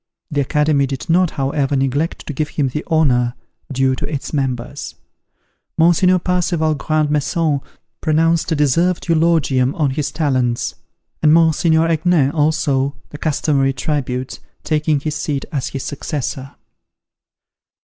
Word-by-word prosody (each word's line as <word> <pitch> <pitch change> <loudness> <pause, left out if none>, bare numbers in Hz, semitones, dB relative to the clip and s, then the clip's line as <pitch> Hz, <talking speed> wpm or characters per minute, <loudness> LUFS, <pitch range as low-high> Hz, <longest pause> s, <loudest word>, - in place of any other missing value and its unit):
The 145 -1 +1
Academy 150 0 +2
did 135 +5 -4
not, 180 +1 +4
however, 140 0 -1
neglect 135 +4 -1
to 150 - -5
give 150 +2 -2
him 140 -3 -1
the 150 +4 -4
honour 125 -7 +2 0.4
due 135 0 +2
to - - -4
its 145 0 -4
members. 135 -1 -3 0.8
Mons. 165 +1 +4 0.2
Parseval 175 -3 +1
Grand 155 +1 0
Maison 150 0 0 0.4
pronounced 165 +2 +2
a - - +2
deserved 165 +6 +1
eulogium 155 -6 +2
on 145 -4 +1
his 145 +1 -2
talents, 130 -6 0 0.5
and 150 - +5
Mons. 160 -1 +4
Aignan, 160 -2 +3
also, 145 -3 +1 0.2
the 150 - -9
customary 140 -3 +1
tribute, 130 -2 -3 0.2
taking 155 -1 +1
his 150 +1 -2
seat 145 -2 -2
as 140 -4 -2
his 135 -2 -5
successor. 135 -1 -4
150 Hz, 130 wpm, -18 LUFS, 135-160 Hz, 0.8 s, and